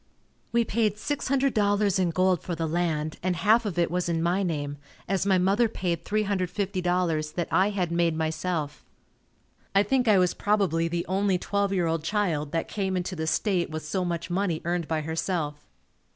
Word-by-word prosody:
We 235 0 +2
paid 215 -1 +1
$600.00 215 -7 +1
in 180 -2 +2
gold 185 +1 +2
for 175 - -4
the 165 0 -2
land 155 -2 -1
and 185 0 0
half 215 +7 +3
of 180 -4 -4
it 170 -2 +2
was 180 0 -1
in 165 -1 0
my 180 +3 +1
name, 145 -6 -2 0.3
as 195 +1 0
my 190 -2 +4
mother 200 +6 +3
paid 170 -5 -3
$350.00 180 -5 0
that 175 -2 -1
I 190 +2 +4
had 185 -4 -1
made 170 -1 +1
myself. 160 -1 -2 0.9
I 200 - +6
think 250 +4 +1
I 210 -2 +6
was 180 -2 +3
probably 195 -6 +1
the 170 0 -2
only 195 0 +1
twelve 200 +2 -1
year 185 -3 +1
old 165 -1 -1
child 160 -6 -1
that 165 -1 -1
came 190 -2 -2
into 180 +1 -3
the 160 -1 -3
state 185 0 +1
with 155 -1 -5
so 185 +4 -1
much 170 -1 -3
money 180 -3 0
earned 170 -2 -1
by 160 -1 -1
herself. 160 -1 -2
180 Hz, 180 wpm, -26 LUFS, 165-200 Hz, 0.9 s, I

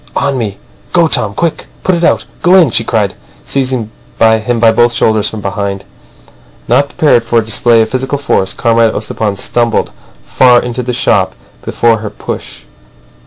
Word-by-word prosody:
"On 140 -1 0
me! 105 -6 -3 0.4
Go, 170 -2 +4
Tom. 105 -8 0
Quick! 165 +4 -2 0.2
Put 185 - +1
it 170 0 -1
out.... - - +2 0.2
Go 180 +1 +4
in!" 170 -9 +5
she 115 - 0
cried, 110 -3 -1 0.3
seizing 130 -5 -2 0.3
him 110 +1 +2
by 115 -1 +5
both 120 +1 +2
shoulders 110 -2 +1
from 110 - -7
behind. 100 -1 -3 0.8
Not 130 +4 +2
prepared 140 -7 +2
for 115 0 0
a 115 - +2
display 115 +1 +3
of 110 - -5
physical 130 +2 -2
force, 95 -9 0
Comrade 115 0 +1
Ossipon 105 -3 -3
stumbled 120 +2 0 0.3
far 125 -2 +4
into 125 +1 -4
the 125 0 -3
shop 125 - +1 0.3
before 115 -2 +1
her 110 -1 -5
push. - - -7
115 Hz, 165 wpm, -12 LUFS, 110-130 Hz, 0.8 s, in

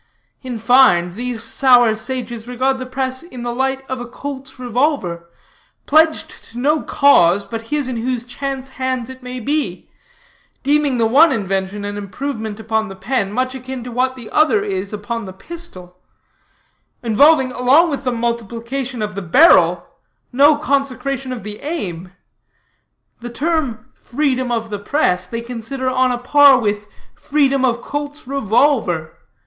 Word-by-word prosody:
In 255 -3 -5
fine, 220 -7 +4
these 240 +1 -3
sour 245 -2 +4
sages 240 0 -5
regard 260 +2 0
the 255 - -6
press 260 0 -3
in 255 -8 -9
the 240 0 -3
light 265 +1 -1
of 260 -1 -4
a 240 - -6
Colt's 265 +1 -8
revolver, 245 - -1 0.6
pledged 315 +1 +2
to 230 - -13
no 295 +5 +1
cause 200 -9 +4
but 225 -1 -7
his 295 -1 -1
in 255 -2 -3
whose 245 +1 -2
chance 265 +2 -5
hands 255 -1 -2
it 260 0 -13
may 250 0 -6
be; 290 +5 -3 0.7
deeming 285 -1 +2
the 230 - +2
one 290 +8 +5
invention 195 -2 -2
an 205 0 -4
improvement 220 +1 -5
upon 220 0 -1
the 195 - -9
pen, 200 +1 -2
much 255 +3 -1
akin 260 -1 -7
to 245 - -7
what 255 +2 0
the 235 -4 -10
other 320 +7 +3
is 385 - -3
upon 215 +2 -4
the 190 - -8
pistol; 190 - -10 1.0
involving, 265 +4 +4
along 275 +8 +4
with 280 -1 -3
the 255 - 0
multiplication 235 +2 -3
of 210 0 -4
the 200 - -5
barrel, 260 - +5 0.5
no 285 +4 +6
consecration 275 -2 -2
of 245 -5 -6
the 210 0 -7
aim. 185 - -5 1.1
The 240 0 -7
term 275 -4 -2
'freedom 260 -2 -1
of 225 -2 -2
the 205 - -3
press' 205 -6 0
they 230 0 -4
consider 245 +2 -5
on 255 0 +2
a 245 - -1
par 280 +2 +6
with 210 -3 -2 0.3
freedom 275 -2 +1
of 240 -2 +1
Colt's 290 +1 -5
revolver. 225 - +1
250 Hz, 155 wpm, -18 LUFS, 220-275 Hz, 1.1 s, no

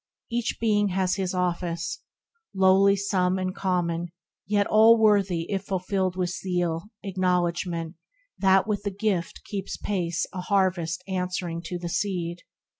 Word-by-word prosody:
Each 235 0 -1
Being 210 -2 +2
has 185 0 0
his 185 -1 -2
office, 170 -2 -2 0.6
lowly 190 +1 +5
some 190 -2 +1
And 185 0 -2
common, 175 -2 -1 0.4
yet 205 0 +2
all 220 +2 +6
worthy 200 -6 +3
if 195 0 -2
fulfilled 185 -1 -1
With 180 -1 -1
zeal, 175 -2 -2 0.2
acknowledgment 175 -3 -1 0.4
that 190 -1 +4
with 210 -2 -1
the 205 - -2
gift 195 -3 -2
Keeps 200 -2 -4
pace 175 -4 -1
a 185 - -4
harvest 185 -3 0
answering 180 -2 -2
to 180 - -4
the 175 0 -5
seed. 175 -2 -2
185 Hz, 135 wpm, -26 LUFS, 175-200 Hz, 0.6 s, all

